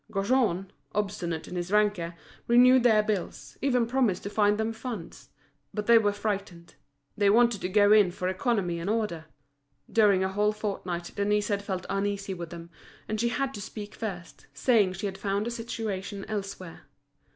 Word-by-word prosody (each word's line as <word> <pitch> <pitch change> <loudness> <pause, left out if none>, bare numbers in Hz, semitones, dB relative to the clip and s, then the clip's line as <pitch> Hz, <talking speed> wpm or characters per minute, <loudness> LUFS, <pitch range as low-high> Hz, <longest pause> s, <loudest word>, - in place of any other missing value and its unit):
Gaujean, 195 -3 +1 0.2
obstinate 195 -6 -2
in - - -7
his 175 +1 -3
rancour, 205 -5 +1 0.3
renewed 250 +2 +6
their 220 -3 +4
bills, 210 -4 -4
even 250 -3 +2
promised 235 -6 +1
to 200 - -5
find 205 -1 +3
them 220 +1 -1
funds; 225 -6 -7 0.5
but 210 -1 -2
they 235 0 +7
were 205 -2 +2
frightened, 200 -4 -4 0.4
they 205 -1 +3
wanted 235 0 +4
to 180 - -2
go 205 +1 +4
in 210 -3 +6
for 180 +1 -4
economy 185 -3 0
and 170 +4 -3
order. 210 -8 -1 0.7
During 205 -4 +4
a 190 - 0
whole 210 +2 +1
fortnight 185 -5 -4
Denise 210 +1 +1
had 200 -1 0
felt 185 -2 -4
uneasy 200 0 -2
with 170 -2 -7
them, 170 0 -10 0.4
and 215 0 -2
she 235 - +2
had 270 +2 -1
to 205 - -6
speak 210 0 -8
first, 185 -6 -7
saying 215 -7 +3
she 190 +3 -5
had 195 -1 -4
found 200 +1 -1
a 235 - -3
situation 215 -4 -4
elsewhere. 195 -5 -6
205 Hz, 175 wpm, -28 LUFS, 185-220 Hz, 0.7 s, they